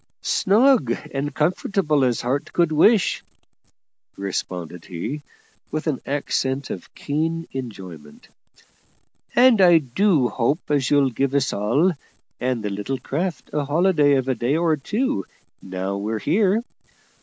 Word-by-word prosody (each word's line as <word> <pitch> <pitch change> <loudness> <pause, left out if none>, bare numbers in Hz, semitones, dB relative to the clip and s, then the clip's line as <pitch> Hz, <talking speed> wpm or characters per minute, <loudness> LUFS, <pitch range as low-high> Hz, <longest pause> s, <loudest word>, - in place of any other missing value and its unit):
"Snug 215 - +3 0.2
and 140 +1 -2
comfortable 155 -1 +1
as 125 -2 +1
heart 130 +4 -2
could 170 -2 +2
wish," 185 +6 +3 0.9
responded 90 -3 -5
he, 95 - -5 0.5
with 155 +1 -4
an 150 -5 -1
accent 135 -1 -1
of - - -8
keen 165 +3 -2
enjoyment; 95 - -9 1.1
"and 245 -4 +6
I 175 -2 +7
do 155 - +2
hope 140 +8 -1
as 140 -4 +1
you'll 140 -2 +3
give 135 +4 -1
us 135 -1 +1
all, 120 - +2 0.5
and 125 -3 -1
the 105 - -2
little 105 +7 -3
craft, 155 0 -4
a 150 -1 0
holiday 150 -1 +3
of 130 -1 0
a 130 - +2
day 125 +5 0
or 165 -2 +2
two, 180 - -1 0.4
now 95 +1 -4
we're 110 +2 -2
here. 205 - +1
140 Hz, 130 wpm, -22 LUFS, 120-165 Hz, 1.1 s, I